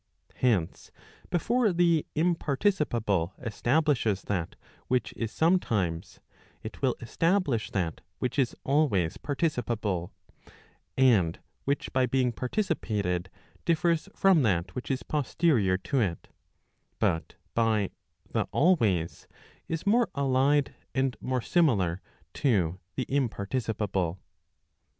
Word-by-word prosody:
Hence, 105 -10 0 0.4
before 220 +5 +2
the 170 -3 +2
imparticipable 150 - +1
establishes 120 -3 +1
that 90 -5 -3 0.3
which 125 -1 0
is 115 -2 -3
sometimes, 110 - 0 0.4
it 110 - -8
will 130 -3 +2
establish 155 - +1
that 85 -5 -2 0.2
which 125 +2 -2
is 130 -3 +1
always 130 - +1
participable; 120 - -1 0.9
and 110 -11 +4 0.3
which 140 +1 -1
by 130 -1 +3
being 125 0 +1
participated 110 - -1 0.3
differs 170 -1 +1
from 190 -5 +5
that 90 -6 +1
which 125 - -6
is 130 -1 -1
posterior 140 - +1
to 130 +8 -1
it, 90 -7 -2 0.7
but 80 0 0 0.2
by 110 -4 +1 0.4
the - - 0
always 110 - +2 0.4
is 165 +2 -3
more 230 +4 +3
allied 140 +1 +2 0.2
and 130 -1 +1
more 130 -1 -1
similar 105 - +2 0.3
to 95 - +1 0.2
the 130 - -1
imparticipable. 105 -7 -1
125 Hz, 105 wpm, -28 LUFS, 100-150 Hz, 0.9 s, from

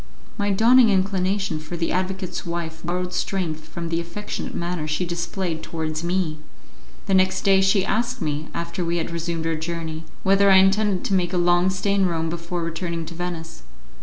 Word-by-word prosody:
My 205 -2 0
dawning 230 +4 +6
inclination 190 -3 +1
for 155 +3 -6
the 165 0 -1
advocate's 185 0 -2
wife 170 -2 -4
borrowed 180 +1 -2
strength 165 -6 -2
from 170 -1 -5
the 165 0 0
affectionate 170 +5 -5
manner 170 -2 -2
she 155 +4 -1
displayed 170 -1 -3
towards 160 -1 -3
me. 170 -3 -1 0.7
The 195 - 0
next 185 0 +3
day 195 -1 +4
she 195 0 +3
asked 240 +5 0
me, 150 +1 -2
after 170 +1 -3
we 170 0 0
had 170 - -2
resumed 170 -1 -3
our 165 - +1
journey, 160 0 -4 0.2
whether 195 +1 +5
I 190 - +7
intended 195 0 +4
to - - 0
make 180 -1 +1
a - - +1
long 175 +1 +4
stay 190 +2 0
in 195 -2 +3
Rome 165 -2 -1
before 170 +1 -3
returning 165 0 -3
to 170 - -8
Venice. 165 -1 -5
175 Hz, 185 wpm, -23 LUFS, 165-190 Hz, 0.7 s, I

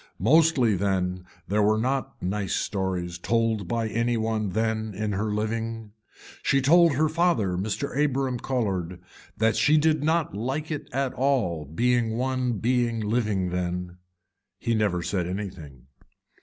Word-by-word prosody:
Mostly 135 - +4
then 90 -1 -1 0.2
there 105 +2 +1
were 105 +1 +3
not 130 +4 -2
nice 95 +1 -1
stories 90 -3 -2
told 115 -1 0
by 115 +3 -1
any 115 +2 0
one 110 -2 -1
then 110 -1 -1
in 105 +1 -2
her 105 +2 -1
living. 110 +1 -3 0.5
She 140 - +2
told 165 +4 +5
her 155 +3 +3
father 160 - +1
Mr. 110 +9 -1
Abram 135 -3 0
Colhard 95 -10 -2 0.4
that 110 0 +2
she 150 +1 +4
did 155 -1 +2
not 160 - +1
like 135 +10 -3
it 150 - -5
at 135 0 -1
all 120 - 0
being 115 - +1
one 130 -1 0
being 120 +1 0
living 105 -4 0
then. 90 0 -3 0.6
He 115 - -1
never 100 -6 +1
said 90 0 -1
anything. 90 -10 -7
110 Hz, 140 wpm, -26 LUFS, 95-130 Hz, 0.6 s, told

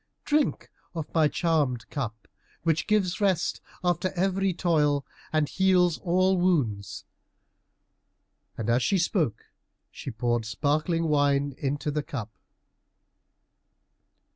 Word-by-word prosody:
drink 300 0 0 0.2
of 160 -2 -3
my 160 -2 +4
charmed 145 -7 0
cup, 115 -7 -5 0.4
which 160 -1 +1
gives 205 -2 +1
rest 190 -4 +1 0.2
after 180 +1 +1
every 190 +1 +1
toil 150 -5 +1 0.3
and 155 -2 +2
heals 180 -3 +3
all 185 +1 +2
wounds;" 120 - 0 1.5
and 115 - -3
as 120 +2 +3
she 195 - +2
spoke 170 - 0 0.5
she - - -7
poured 120 0 0
sparkling 150 +9 0
wine 145 -1 +2
into 145 +2 -2
the 150 +1 -1
cup. 115 -6 -6
155 Hz, 110 wpm, -27 LUFS, 135-180 Hz, 1.5 s, my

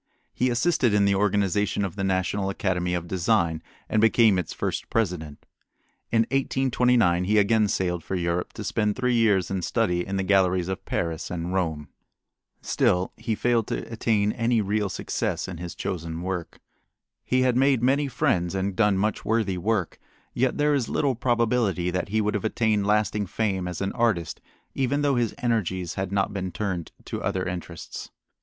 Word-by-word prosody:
He 125 - +1
assisted 120 -3 +2
in 100 -1 +4
the 100 - +3
organization 100 0 +1
of 95 - -5
the 100 - -3
National 95 +1 0
Academy 90 -2 -1
of 85 -1 -4
Design 85 -3 +1 0.3
and 110 - +1
became 110 -3 +5
its 85 - -4
first - - -3
president. 85 -9 -2 0.7
In 115 0 +4
1829 125 -9 +2
he 105 +3 +2
again 105 +1 +4
sailed 90 -4 -1
for 95 - -3
Europe 85 0 -1
to - - -6
spend 105 -1 0
three 125 -1 0
years 105 -6 +2
in 95 -1 -1
study 90 -3 0
in 95 +1 -3
the 95 - 0
galleries 95 -2 +2
of 95 - -4
Paris 85 -1 -2
and 90 +1 -4
Rome. 80 -6 -1 0.8
Still 90 +1 +1
he 115 -2 -2
failed 120 -1 +1
to - - -4
attain 105 -2 +1
any 115 0 +1
real 105 0 0
success - - -2
in 90 - -6
his 85 +1 -7
chosen 85 -1 -4
work. 90 -3 -4 0.6
He 130 0 +1
had 125 -2 +2
made 130 -2 +3
many 140 +3 +3
friends 90 -8 0
and 95 0 -1
done 105 -1 +3
much 105 +2 -1
worthy 105 -5 0
work, 100 -2 -1 0.3
yet 130 +1 0
there 150 0 +3
is 135 -5 0
little 140 -2 +1
probability 115 -7 +1
that 90 +2 -2
he 110 +2 +1
would 105 0 0
have 105 - -2
attained 110 -2 +1
lasting 105 -1 +1
fame 95 -3 -1
as 90 0 -5
an 95 - -1
artist 105 -9 0 0.3
even 140 +2 0
though 140 -1 +3
his 120 -3 0
energies 95 -7 0
had 95 -1 -3
not 100 0 0
been 95 -2 -3
turned 90 -2 -3
to - - -5
other 95 -1 -1
interests. 90 -2 -6
100 Hz, 175 wpm, -25 LUFS, 90-115 Hz, 0.8 s, became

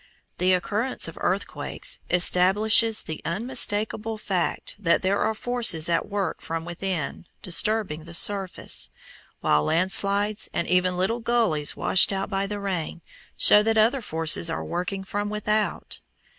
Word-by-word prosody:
The 185 +1 +3
occurrence 210 +7 -2
of - - -9
earthquakes - - -2
establishes 205 +6 +4
the 155 - -7
unmistakable 215 - -1
fact 190 -5 -3
that 170 -3 +1
there 195 +2 +1
are 220 - 0
forces 220 -10 +3
at 170 +3 0
work 200 -2 -3
from 165 0 -5
within 175 -2 -4 0.2
disturbing 185 -4 +1
the 170 0 -9
surface, 185 - +1 0.5
while 75 0 +2
land 175 - +1
slides, 205 +2 0
and 170 - -1
even 180 0 +1
little 195 +6 0
gullies 225 -11 0
washed 190 - +3
out 195 +1 -3
by 195 0 -1
the 205 0 -5
rain, 180 -4 -4 0.3
show 210 - +6
that 225 +1 0
other 235 +5 +3
forces 165 -3 +2
are 160 - -4
working 180 +3 -4
from 205 +2 -4
without. 210 0 -2
195 Hz, 145 wpm, -24 LUFS, 170-215 Hz, 0.5 s, show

